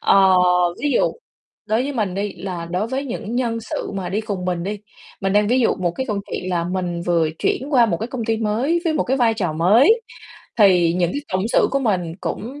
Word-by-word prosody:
Ờ, 190 Hz, -1 st, +5 dB, 0.5 s
ví 295 Hz, -, 0 dB
dụ -, -, +2 dB, 0.5 s
đối 220 Hz, +3 st, +1 dB
với 285 Hz, -, -3 dB
mình 210 Hz, -8 st, -2 dB
đi 200 Hz, +1 st, -2 dB
là 180 Hz, -3 st, -6 dB
đối 185 Hz, +5 st, -1 dB
với 265 Hz, +4 st, -3 dB
những 235 Hz, -3 st, -5 dB
nhân 235 Hz, -2 st, -1 dB
sự 225 Hz, -, -5 dB
mà 190 Hz, -2 st, -3 dB
đi 200 Hz, +4 st, -1 dB
cùng 200 Hz, -4 st, -4 dB
mình 180 Hz, -2 st, -2 dB
đi. 205 Hz, +2 st, -4 dB, 0.4 s
Mình 195 Hz, 0 st, 0 dB
đang 205 Hz, 0 st, +3 dB
ví 255 Hz, +3 st, +3 dB
dụ 235 Hz, -, +2 dB
một 180 Hz, -2 st, 0 dB
cái 260 Hz, -, -2 dB
câu 210 Hz, -5 st, -2 dB
chuyện 185 Hz, -, -4 dB
là 170 Hz, -2 st, 0 dB
mình 175 Hz, -1 st, -3 dB
vừa 170 Hz, -2 st, +1 dB
chuyển 265 Hz, -, -1 dB
qua 245 Hz, -4 st, +5 dB
một 175 Hz, -6 st, 0 dB
cái 220 Hz, -, -4 dB
công 245 Hz, -2 st, -5 dB
ty 225 Hz, 0 st, 0 dB
mới 230 Hz, +10 st, 0 dB
với 330 Hz, -, +1 dB
một 310 Hz, -, +1 dB
cái 265 Hz, -, 0 dB
vai 235 Hz, -3 st, +3 dB
trò 180 Hz, -7 st, -2 dB
mới, 220 Hz, -, +4 dB, 0.6 s
thì 180 Hz, -6 st, +5 dB
những 175 Hz, -1 st, 0 dB
cái 285 Hz, -, -2 dB
cộng 190 Hz, +3 st, 0 dB
sự -, -, +4 dB
của 275 Hz, -, +1 dB
mình 185 Hz, -10 st, -1 dB
cũng 255 Hz, +8 st, -5 dB
210 Hz, 240 wpm, -21 LUFS, 180-240 Hz, 0.6 s, Ờ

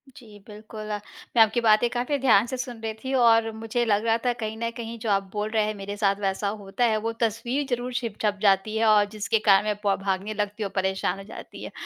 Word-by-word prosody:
जी, 215 Hz, -4 st, -14 dB
बिल्कुल, 215 Hz, 0 st, -9 dB, 0.5 s
मैं 230 Hz, -, +6 dB
आपकी 220 Hz, +2 st, 0 dB
बातें 220 Hz, +1 st, +4 dB
काफ़ी 245 Hz, +4 st, -1 dB
ध्यान 225 Hz, -5 st, +4 dB
से 260 Hz, -, -4 dB
सुन 245 Hz, -2 st, -5 dB
रही 220 Hz, -1 st, -3 dB
थी 265 Hz, +1 st, -3 dB
और 230 Hz, -3 st, +4 dB
मुझे 225 Hz, +2 st, -2 dB
लग 210 Hz, 0 st, +1 dB
रहा 225 Hz, 0 st, +3 dB
था 245 Hz, -, +2 dB
कहीं 220 Hz, 0 st, -4 dB
न 230 Hz, +1 st, -2 dB
कहीं 230 Hz, 0 st, -6 dB
जो 220 Hz, -, -3 dB
आप 195 Hz, -1 st, +2 dB
बोल 210 Hz, 0 st, -2 dB
रहे 220 Hz, -1 st, +1 dB
हैं 215 Hz, -, -2 dB
मेरे 200 Hz, 0 st, -6 dB
साथ 200 Hz, -1 st, +2 dB
वैसा 195 Hz, +1 st, -1 dB
होता 200 Hz, +5 st, -1 dB
है, 220 Hz, -2 st, +2 dB
वो 225 Hz, +1 st, -2 dB
तस्वीर 235 Hz, +5 st, -1 dB
ज़रूर 245 Hz, 0 st, -2 dB
छिप 230 Hz, -4 st, -3 dB
छप 210 Hz, -2 st, +1 dB
जाती 200 Hz, +1 st, +2 dB
है 225 Hz, -, +2 dB
और 210 Hz, -1 st, +5 dB
जिसके 215 Hz, +1 st, 0 dB
कारण 200 Hz, -1 st, +5 dB
मैं 210 Hz, -1 st, 0 dB
पो 200 Hz, -1 st, +2 dB
भागने 195 Hz, +2 st, -1 dB
लगती 210 Hz, 0 st, -3 dB
हूँ, 200 Hz, -, -4 dB
परेशान 190 Hz, -1 st, 0 dB
हो 195 Hz, -, -9 dB
जाती 195 Hz, -, -10 dB
है -, -, -7 dB
215 Hz, 245 wpm, -25 LUFS, 205-230 Hz, 0.5 s, मैं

